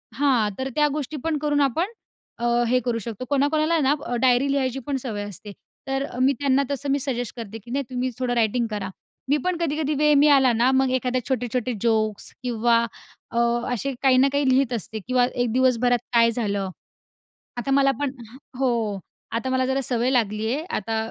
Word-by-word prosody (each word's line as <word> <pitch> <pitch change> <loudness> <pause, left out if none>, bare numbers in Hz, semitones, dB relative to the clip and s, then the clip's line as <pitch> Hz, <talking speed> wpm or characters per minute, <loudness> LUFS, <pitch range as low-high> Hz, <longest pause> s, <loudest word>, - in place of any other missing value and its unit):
हां, 260 -7 +2
तर 265 0 -2
त्या 300 -1 +4
गोष्टी 300 0 -4
पण 320 -2 0
करून 290 0 +1
आपण 315 - +1 0.5
अ, 240 - -2 0.2
हे 250 +2 +3
करू 240 -2 0
शकतो. 225 +3 -6
कोणाकोणाला 305 +4 +2
ना, 280 -1 +3 0.3
डायरी 260 +2 +3
लिहायची 270 -2 0
पण 285 - -2
सवय 225 -6 -4
असते. 205 +1 -8 0.4
तर 270 +1 -1 0.2
मी 270 +2 +4
त्यांना 275 -1 +2
तसं 280 0 -3
मी 280 - +2
सजेस्ट 245 -4 -3
करते, 225 -1 -6
की 235 +3 -13
नाही 280 +2 0
तुम्ही 255 0 -2
थोडं 250 -1 0
रायटिंग 235 +1 +1
करा. 205 -2 -3 0.4
मी 290 - +4
पण 365 -1 0
कधी-कधी 305 -2 -1
वेळ 300 0 +4
मिळाला 280 -3 +5
ना, 240 +3 +3
मग 265 0 +3
एखाद्या 255 0 0
छोटे-छोटे 250 -1 -1
जोक्स 220 -3 0
किंवा 235 -1 +2 0.5
अ, 235 - -4 0.4
असे 275 +4 -2
काही 260 -1 +5
ना 265 +2 +5
काही 285 -2 +2
लिहीत 260 -1 +2
असते 220 -1 -4
किंवा 250 -1 +3
एक 245 -2 0
दिवसभरात 245 -1 +3
काय 230 -1 +5
झालं. 205 -4 -2 0.9
आता 240 +3 -2
मला 275 0 +4
पण 285 -2 -1 0.5
हो. 230 -6 0 0.3
आता 230 +3 -2
मला 260 0 +1
जरा 265 +1 0
सवय 245 0 +1
लागली 215 -3 0
आहे, 300 +4 -2
आता 225 +2 -2
255 Hz, 185 wpm, -24 LUFS, 235-275 Hz, 0.9 s, मिळाला